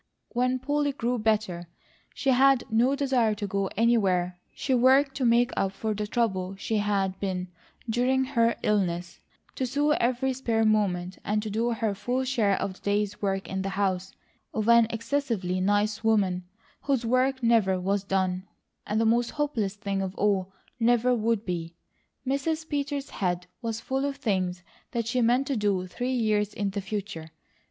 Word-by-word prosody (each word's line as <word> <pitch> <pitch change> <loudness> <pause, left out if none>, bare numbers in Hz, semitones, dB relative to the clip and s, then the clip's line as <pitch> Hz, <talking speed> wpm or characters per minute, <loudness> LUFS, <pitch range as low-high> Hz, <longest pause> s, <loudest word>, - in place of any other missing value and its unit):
When 250 +1 +1
Polly 285 +2 0
grew 245 -2 -1
better, 210 -6 0 0.5
she 270 - +1
had 265 0 +5
no 240 +5 +3
desire 260 -6 +1
to 205 0 -4
go 195 0 -1
anywhere; 190 -6 +2 0.2
she 265 - -1
worked 265 +3 +4
to 265 - 0
make 235 +1 +4
up 195 0 0
for 220 +1 -2
the 210 0 -3
trouble 195 -5 -1
she 215 +3 -2
had 195 -2 0
been 185 -2 -3 0.4
during 250 +3 +2
her 235 -3 +2
illness, 175 -4 0 0.3
to 260 - -2
sew 290 +4 +1
every 255 -1 +1
spare 230 -4 0
moment, 190 -4 +1
and 210 0 0
to 215 - -4
do 230 +3 0
her 220 -2 -1
full 245 +6 -1
share 230 -7 +1
of 195 - -2
the - - -18
day's 205 0 -1
work 195 -1 -1
in 190 0 -3
the 195 - -2
house 190 -1 -1 0.4
of 215 0 -1
an 235 -1 +6
excessively 230 -6 -1
nice 205 +3 +1
woman, 195 -5 +2 0.4
whose 270 -4 0
work 255 +2 +1
never 215 -5 +3
was 195 +2 0
done, 190 -1 -1 0.4
and 220 +2 +1
most 235 +2 +2
hopeless 245 -10 -1
thing 200 -1 -2
of 190 0 -4
all, 195 -2 +1 0.3
never 240 +1 +3
would 225 -2 0
be. 170 -2 -4 0.5
Mrs. 310 +4 -1
Peters' 285 -1 -3
head 180 -2 -1 0.2
was 225 -2 -3
full 265 +3 -2
of 280 -1 -2
things 185 -8 -1 0.3
that 235 -2 -1
she 245 +2 0
meant 245 +4 +3
to 275 - -1
do 200 -4 0
three 245 +8 -3
years 210 -3 +1
in 200 -1 -1
the 200 +1 -3
future. 195 -5 -5
220 Hz, 170 wpm, -27 LUFS, 195-250 Hz, 0.5 s, an